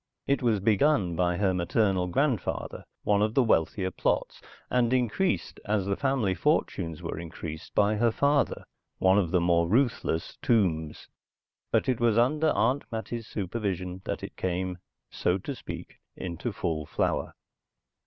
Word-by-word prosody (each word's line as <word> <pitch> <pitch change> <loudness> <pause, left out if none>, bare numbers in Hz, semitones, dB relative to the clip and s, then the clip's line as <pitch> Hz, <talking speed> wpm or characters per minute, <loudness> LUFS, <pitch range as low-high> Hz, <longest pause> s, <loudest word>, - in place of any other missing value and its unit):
It 140 +1 +1
was 115 -5 +2
begun 105 - +2
by 90 0 +1
her 95 -1 +2
maternal 90 +1 +1
grandfather, 125 - -1 0.2
one 105 -1 +2
of 110 +1 +1
the 135 - +5
wealthier 95 -2 +1
Plots, - - -1 0.3
and 125 -1 +2
increased 130 - 0
as 105 -2 0
the 100 0 0
family 130 -8 +1
fortunes 80 -2 0
were - - -4
increased 85 -1 -8
by 105 +1 +3
her 120 +2 +3
father, 140 +4 +1 0.3
one 95 +2 +4
of 90 -5 0
the 90 +2 +3
more 85 -1 +3
ruthless 115 -8 0
Tombs, 90 - +1 0.6
but - - +2
it 130 -3 +1
was 115 -2 +3
under 150 +6 +3
Aunt 130 +6 +1
Mattie's 115 0 -4
supervision 95 -3 -3
that - - -3
it - - -7
came, 90 0 -2 0.3
so 90 - +1
to 120 +9 -5
speak, 125 - -9 0.2
into 85 -3 -4
full 80 -3 -3
flower. - - -1
100 Hz, 150 wpm, -28 LUFS, 90-120 Hz, 0.6 s, the